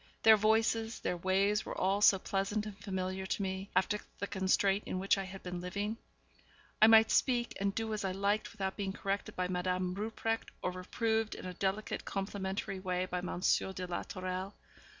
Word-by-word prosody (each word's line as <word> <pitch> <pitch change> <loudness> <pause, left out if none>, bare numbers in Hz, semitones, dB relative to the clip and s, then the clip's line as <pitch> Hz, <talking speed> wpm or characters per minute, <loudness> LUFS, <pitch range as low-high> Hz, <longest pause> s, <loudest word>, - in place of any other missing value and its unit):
Their 220 0 +9
voices, 225 +1 +2
their - - -1
ways 195 +4 +2
were - - -6
all 195 +2 +1
so 200 - +7
pleasant 195 +3 -1
and 210 -2 -6
familiar 190 -1 -3
to 200 - -1
me, 190 +1 -3
after 210 +2 +2 0.2
the - - -2
constraint 195 +1 +1
in - - -2
which 195 +2 +3
I 195 -1 -3
had 190 +1 -9
been 180 -1 -4
living. 200 +4 -2 0.9
I 215 - +10
might 225 0 +7
speak 240 -2 +2
and 195 0 0
do 225 -1 -2
as 210 - -2
I 190 - 0
liked 200 +3 0
without 195 -4 -3
being 195 -2 -3
corrected 200 0 -3
by 180 0 0
Madame 180 0 -1
Rupprecht, 225 +2 -2
or 180 - 0
reproved 220 +4 -1
in - - -8
a 180 - -5
delicate, 195 +3 -2
complimentary 195 -1 -3
way 185 -1 -1
by 180 -1 -3
Monsieur 180 +1 +1
de 185 0 -4
la 175 -1 -3
Tourelle. 185 +1 -5
195 Hz, 190 wpm, -33 LUFS, 185-210 Hz, 0.9 s, I